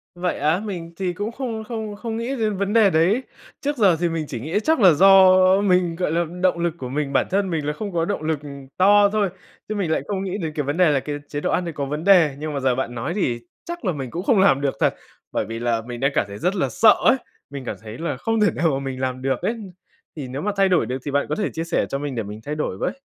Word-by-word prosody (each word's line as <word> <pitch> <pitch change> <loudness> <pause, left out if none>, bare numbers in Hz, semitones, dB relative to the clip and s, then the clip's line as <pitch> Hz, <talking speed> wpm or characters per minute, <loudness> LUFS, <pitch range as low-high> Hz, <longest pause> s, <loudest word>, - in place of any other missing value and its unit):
Vậy 180 0 -2
á, 155 +5 +2
mình 175 -6 -6
thì 185 -1 -2
cũng 205 +4 -4
không 230 -3 -4
không 220 -2 -5
không 225 +1 -5
nghĩ 240 +4 -3
đến 215 -5 -1
vấn 200 +2 -1
đề 220 -4 +6
đấy. 185 +10 +2 0.4
Trước 290 0 -2
giờ 195 -6 +5
thì 175 -1 +1
mình 165 -1 -2
chỉ 120 - -5
nghĩ 160 - -1
chắc 320 +5 +2
là 190 -5 +7
do 190 +3 +7 0.3
mình 180 -4 +2
gọi 180 -3 -1
là, 170 +1 +1 0.2
động 180 -2 +3
lực 170 -1 0
của 125 -4 -6
mình 140 0 -2
bản - - +2
thân 195 0 0
mình 160 -4 -2
là 150 - -1
không 200 +5 -6
có 165 -1 +1
động 200 -3 -3
lực 155 -2 -1 0.4
to 205 +2 +6
thôi, 205 -2 +1 0.4
chứ 215 - -2
mình 185 -6 -1
lại - - +1
không 195 -2 -2
nghĩ 195 +1 -3
đến 160 -5 -4
cái 150 - -1
vấn 145 +4 -2
đề 180 -4 +5
là 140 - +2
cái 145 +2 -5
chế 145 - -4
độ - - -1
ăn 180 - 0
đấy 170 - -4
có 140 -1 -3
vấn 150 +3 -4
đề. 175 -7 +5
Nhưng 155 0 -4
mà 140 - -2
giờ 130 -2 +1
bạn 120 -2 -3
nói 120 +9 -3
thì 125 - -1 0.3
chắc 345 -6 -6
là 185 - +2
mình 135 -6 -5
cũng 175 - -4
không 210 -1 +3
làm 175 -8 +4
được 140 -2 0
thật, - - +2 0.4
bởi - - -1
vì 115 +2 -6
là 120 -1 0
mình 120 +1 -7
đang 135 +3 +1
cảm - - +1
thấy 100 0 -8
rất 180 +3 0
là 185 - 0
sợ 220 -2 +6
ấy! - - +6 0.3
Mình 140 -2 -7
cảm - - -4
thấy 110 +1 -9
là 160 -5 -3
không 225 - -1
thể 210 - +4
nào 165 - 0
mà 135 - -1
mình 135 -1 -5
làm 130 0 -2
được 135 -2 -1
ấy. 230 - -1 0.6
Thì 140 -4 -6
nếu 135 +3 -5
mà 210 - -1
thay 195 -1 +4
đổi 180 - +3
được 125 - -3
thì 145 - -3
bạn 140 +1 +1
có 150 - 0
thể 205 - -1
chia 165 - -3
sẻ 165 - 0
cho 135 - -2
mình 145 -3 -4
để 115 - -2
mình 105 +1 -8
thay 150 - -3
đổi 150 -11 -3
với. 270 - -3
170 Hz, 295 wpm, -22 LUFS, 140-200 Hz, 0.6 s, là